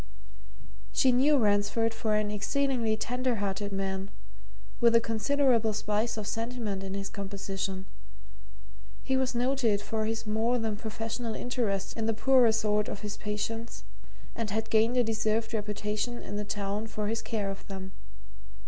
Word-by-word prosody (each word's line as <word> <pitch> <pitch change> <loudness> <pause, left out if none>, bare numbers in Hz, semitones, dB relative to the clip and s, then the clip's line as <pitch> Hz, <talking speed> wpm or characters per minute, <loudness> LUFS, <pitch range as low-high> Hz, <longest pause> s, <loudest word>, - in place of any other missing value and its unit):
She 260 - +4
knew 280 +4 +5
Ransford 210 0 +2
for 220 -1 0
an 210 -1 +1
exceedingly 230 +1 +1
tender 250 +2 0
hearted 200 0 -2
man, 195 0 -2 0.7
with 235 -1 +5
a - - +8
considerable 230 0 +2
spice 215 +2 0
of 215 - -3
sentiment 225 -3 -2
in 195 0 -4
his 200 0 -3
composition: 195 -1 -4 1.2
he 265 - +1
was 260 -2 +1
noted 245 -4 +2
for 215 +1 -2
his 225 +1 -2
more 220 +3 +1
than 220 -2 -1
professional 225 +1 -4
interest 210 -6 -1
in 225 -1 -1
the 225 - +1
poorer 255 0 +5
sort 210 -1 +1
of - - -5
his 210 -1 -4
patients 225 +2 -4 0.5
and 225 -2 -2
had 220 +2 -2
gained 225 +3 +4
a 245 - +5
deserved 220 0 0
reputation 210 +2 -2
in 205 - -6
the 210 0 -2
town 205 +1 -2
for 215 -1 -3
his 225 +1 -1
care 205 -3 -2
of 195 - -9
them. 190 -1 -6
220 Hz, 155 wpm, -30 LUFS, 205-230 Hz, 1.2 s, a